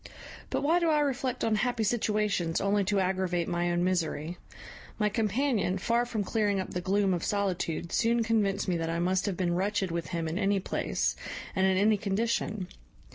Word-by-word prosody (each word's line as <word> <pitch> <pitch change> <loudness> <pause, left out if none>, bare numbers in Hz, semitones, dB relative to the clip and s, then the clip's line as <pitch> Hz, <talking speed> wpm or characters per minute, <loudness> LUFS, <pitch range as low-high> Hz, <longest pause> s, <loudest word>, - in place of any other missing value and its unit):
But - - -1
why 325 +4 +3
do 340 -2 +2
I 305 -1 +3
reflect 265 -3 -1
on 225 - +2
happy 245 -1 0
situations 210 -6 0
only 200 +1 +2
to 200 +1 +1
aggravate 185 -2 0
my 175 -1 0
own 175 0 +1
misery? 175 -2 -1 0.6
my 210 -1 +2
companion, 215 -2 0
far 235 +5 +1
from 220 -3 -2
clearing 205 -1 0
up 190 - -4
the 180 - -3
gloom 195 +1 +2
of 175 - -2
solitude, 180 -5 -1
soon 235 0 +2
convinced 205 -3 +1
me 180 -2 +1
that 165 0 -2
I 165 - -1
must 185 +3 +1
have 190 -4 -2
been 175 -2 0
wretched 190 0 0
with 170 0 -3
him 170 -2 -3
in 165 +4 -2
any 200 -1 +2
place, 190 - -1 0.4
and 190 0 +3
in 190 -1 +2
any 210 +2 +4
condition. 210 -1 -1
195 Hz, 190 wpm, -29 LUFS, 180-220 Hz, 0.6 s, any